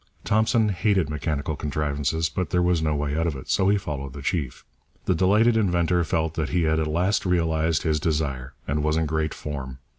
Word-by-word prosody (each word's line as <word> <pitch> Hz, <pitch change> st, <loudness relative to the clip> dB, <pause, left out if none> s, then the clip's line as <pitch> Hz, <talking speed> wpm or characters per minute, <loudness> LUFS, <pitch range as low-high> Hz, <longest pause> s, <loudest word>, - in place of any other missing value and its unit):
Thompson 110 Hz, +1 st, +2 dB
hated 95 Hz, -4 st, +1 dB
mechanical 75 Hz, 0 st, -2 dB
contrivances, 75 Hz, +2 st, -1 dB
but 85 Hz, +1 st, -3 dB
there 90 Hz, 0 st, +2 dB
was 90 Hz, -2 st, +2 dB
no 75 Hz, -1 st, 0 dB
way 75 Hz, 0 st, -1 dB
out 80 Hz, +1 st, 0 dB
of 80 Hz, -, -2 dB
it, 65 Hz, -, -6 dB
so 95 Hz, -, +3 dB
he 100 Hz, -, +4 dB
followed 70 Hz, -7 st, -5 dB
the 70 Hz, -1 st, -8 dB
chief. 70 Hz, -6 st, -2 dB, 0.4 s
The -, -, +2 dB
delighted 105 Hz, +7 st, +3 dB
inventor 90 Hz, -4 st, +2 dB
felt 80 Hz, -1 st, -1 dB
that 80 Hz, -3 st, -2 dB
he 90 Hz, -1 st, +1 dB
had 80 Hz, 0 st, +2 dB
at 80 Hz, -, 0 dB
last 90 Hz, +6 st, +1 dB
realized 80 Hz, -3 st, +1 dB
his 80 Hz, -1 st, +1 dB
desire, 70 Hz, -5 st, -2 dB
and 75 Hz, +2 st, 0 dB
was 75 Hz, +1 st, +1 dB
in 80 Hz, -, +1 dB
great 80 Hz, 0 st, -1 dB
form. 65 Hz, -4 st, -6 dB
80 Hz, 205 wpm, -24 LUFS, 75-90 Hz, 0.4 s, he